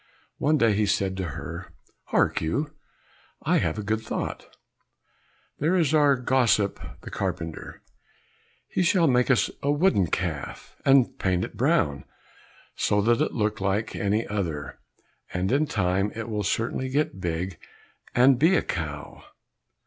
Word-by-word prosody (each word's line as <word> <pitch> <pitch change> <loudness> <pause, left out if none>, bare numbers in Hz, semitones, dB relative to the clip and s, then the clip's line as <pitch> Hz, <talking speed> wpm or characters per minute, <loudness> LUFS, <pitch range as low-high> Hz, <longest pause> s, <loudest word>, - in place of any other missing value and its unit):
One 155 +2 +3
day 115 -5 +3
he 105 +1 +1
said 95 -1 0
to 95 - -2
her, - - -7 0.3
"Hark - - +1
you, 140 - -2 0.7
I - - +3
have - - -1
a 105 - -3
good 110 +2 -1
thought, - - -5 1.0
there 165 +6 +2
is 160 -5 +2
our 145 -2 +5
gossip 125 -5 +2 0.2
the - - -9
carpenter, 90 -4 -5 0.8
he - - -1
shall 175 0 +3
make 125 -3 +3
us 130 - +3
a 140 - -1
wooden 145 - +3
calf, 80 -4 -4
and 135 -2 +4
paint 90 -2 +1
it - - -11
brown, 70 -2 +1 0.7
so 105 - +1
that 115 +3 +2
it - - 0
look 105 -2 -1
like 100 +3 -1
any 105 +3 0
other, 85 -8 -4 0.6
and 90 +2 0
in 145 +3 +2
time 95 -1 0
it 115 0 -5
will 105 -2 -2
certainly 115 +5 -1
get 135 -8 -1
big 90 +2 -3 0.6
and 125 +1 +5
be 165 +7 +5
a - - +2
cow." 75 -4 -5
105 Hz, 150 wpm, -26 LUFS, 95-135 Hz, 1.0 s, our